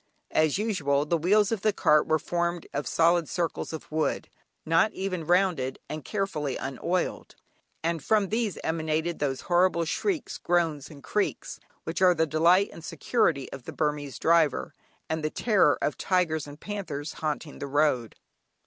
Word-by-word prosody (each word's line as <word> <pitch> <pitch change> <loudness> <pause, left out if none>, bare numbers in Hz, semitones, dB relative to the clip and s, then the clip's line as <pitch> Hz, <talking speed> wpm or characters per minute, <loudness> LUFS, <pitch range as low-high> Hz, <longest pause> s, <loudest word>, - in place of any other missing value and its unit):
As 155 0 +2
usual, 150 -10 0
the 170 - +1
wheels 195 +6 +3
of 225 -4 -1
the 215 - +3
cart 150 -6 +3
were 155 - +3
formed 170 +1 -2
of 140 -3 -2
solid 165 +4 +3
circles 170 -2 -2
of 160 -1 -8
wood, 155 0 -1 0.4
not 165 +7 +3
even 185 -4 -3
rounded, 175 -8 +2
and 155 -1 -6
carefully 155 -10 -2
unoiled, 135 +7 -3 0.5
and 165 -2 -1
from 210 -3 +2
these 220 -5 -1
emanated 160 +1 -1
those 135 -3 -1
horrible 175 -1 +2
shrieks, 330 - -2
groans, 165 -5 0
and 145 -3 -13
creaks, 210 - -2 0.2
which - - -4
are 180 -1 +6
the 160 0 +2
delight 170 +6 +3
and 165 - -11
security 165 - 0
of 135 -3 -9
the - - -7
Burmese 150 -4 -2
driver, 165 -4 +2 0.3
and 160 0 -2
the 155 - +1
terror 195 -7 +3
of 150 - -1
tigers 165 -5 +1
and 145 +1 -11
panthers 165 -8 -5
haunting 155 -1 -3
the 140 - -4
road. 140 -5 +1
160 Hz, 160 wpm, -27 LUFS, 150-185 Hz, 0.5 s, are